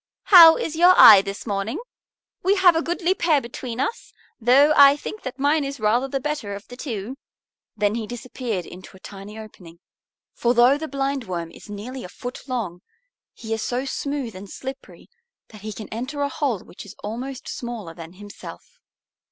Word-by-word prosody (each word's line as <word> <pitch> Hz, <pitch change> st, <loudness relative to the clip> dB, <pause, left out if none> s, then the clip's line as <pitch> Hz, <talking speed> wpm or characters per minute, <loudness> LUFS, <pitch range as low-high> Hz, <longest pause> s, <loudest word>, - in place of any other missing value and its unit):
"How 330 Hz, -3 st, +10 dB
is 320 Hz, -, -4 dB
your 355 Hz, +3 st, +6 dB
eye 200 Hz, -3 st, +10 dB
this 195 Hz, 0 st, -7 dB
morning? 200 Hz, +1 st, -3 dB, 0.6 s
We 385 Hz, +3 st, +2 dB
have 370 Hz, -3 st, +5 dB
a 325 Hz, -, +1 dB
goodly 345 Hz, +2 st, 0 dB
pair 330 Hz, -5 st, +2 dB
between 240 Hz, -1 st, -7 dB
us; 285 Hz, -, -3 dB, 0.3 s
though 270 Hz, +6 st, +5 dB
I 280 Hz, -1 st, +8 dB
think 430 Hz, +8 st, -8 dB
that 255 Hz, 0 st, -7 dB
mine 290 Hz, +2 st, +1 dB
is 275 Hz, -1 st, -5 dB
rather 225 Hz, +5 st, +1 dB
the 270 Hz, 0 st, -3 dB
better 270 Hz, -8 st, -4 dB
of 200 Hz, -, -11 dB
the 245 Hz, -, -9 dB
two." 245 Hz, -2 st, -6 dB, 0.6 s
Then 205 Hz, 0 st, +1 dB
he 225 Hz, -1 st, -4 dB
disappeared 240 Hz, -5 st, -5 dB
into 185 Hz, +1 st, -12 dB
a -, -, -20 dB
tiny 200 Hz, +2 st, -11 dB
opening. 185 Hz, -6 st, -12 dB, 0.6 s
For 240 Hz, +1 st, 0 dB
though 245 Hz, +3 st, +5 dB
the 315 Hz, -, -5 dB
Blindworm 260 Hz, -, -3 dB
is -, -, -15 dB
nearly 240 Hz, +6 st, -7 dB
a 180 Hz, -, -9 dB
foot 245 Hz, +6 st, -9 dB
long 210 Hz, -9 st, -4 dB, 0.5 s
he 225 Hz, -1 st, -6 dB
is 220 Hz, -, -3 dB
so 250 Hz, +4 st, -2 dB
smooth 275 Hz, -5 st, -4 dB
and 195 Hz, +1 st, -10 dB
slippery 265 Hz, +5 st, -9 dB, 0.4 s
that 215 Hz, -2 st, -14 dB
he 215 Hz, +1 st, -6 dB
can 215 Hz, 0 st, -8 dB
enter 255 Hz, +6 st, -5 dB
a 285 Hz, -, 0 dB
hole 265 Hz, -, -2 dB
which -, -, -12 dB
is 205 Hz, -, -12 dB
almost 250 Hz, +5 st, -6 dB
smaller 230 Hz, -8 st, -6 dB
than 165 Hz, +1 st, -11 dB
himself. 205 Hz, -, -12 dB
245 Hz, 185 wpm, -22 LUFS, 205-280 Hz, 0.6 s, How